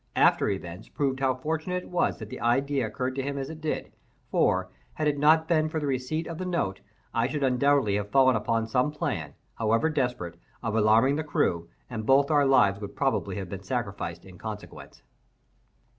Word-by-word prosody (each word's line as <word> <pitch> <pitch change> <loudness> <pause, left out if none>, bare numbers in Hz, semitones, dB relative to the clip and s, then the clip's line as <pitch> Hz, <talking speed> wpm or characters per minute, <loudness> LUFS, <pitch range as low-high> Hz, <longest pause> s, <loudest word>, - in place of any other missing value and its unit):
After - - +4
events 95 0 -5
proved 135 -3 -1
how 135 -1 +2
fortunate 160 +6 -2
it - - -13
was 180 - +1
that 110 -2 -9
the - - -6
idea 135 +1 +1
occurred 125 +4 -3
to - - +1
him 140 +1 -3
as 135 +2 -4
it 160 0 -10
did; 155 - -3 0.4
for, 95 0 +2 0.2
had 155 - 0
it 145 -1 +1
not 160 +2 +5
been 155 -2 +2
for 160 - -2
the 150 - -3
receipt 140 +4 -1
of 165 -1 -6
the - - -2
note, 130 - -1 0.3
I 115 +1 +2
should 145 +1 -2
undoubtedly 130 -4 +3
have 105 0 -4
fallen 130 0 +5
upon 115 +1 0
some 125 +5 +1
plan, 125 - -3 0.2
however 115 +8 +2
desperate, 125 - -2 0.2
of 115 -2 -1
alarming 115 +6 +4
the 155 - -1
crew, 85 - 0 0.2
and 110 - -5
both 135 +5 +4
our 145 -2 +4
lives 105 -7 +4
would 100 - -5
most - - -20
probably 130 -8 0
have 95 -3 -5
been 95 0 -6
sacrificed 100 -7 -4
in 90 -2 -13
consequence. 110 -2 -9
130 Hz, 200 wpm, -27 LUFS, 105-145 Hz, 0.4 s, not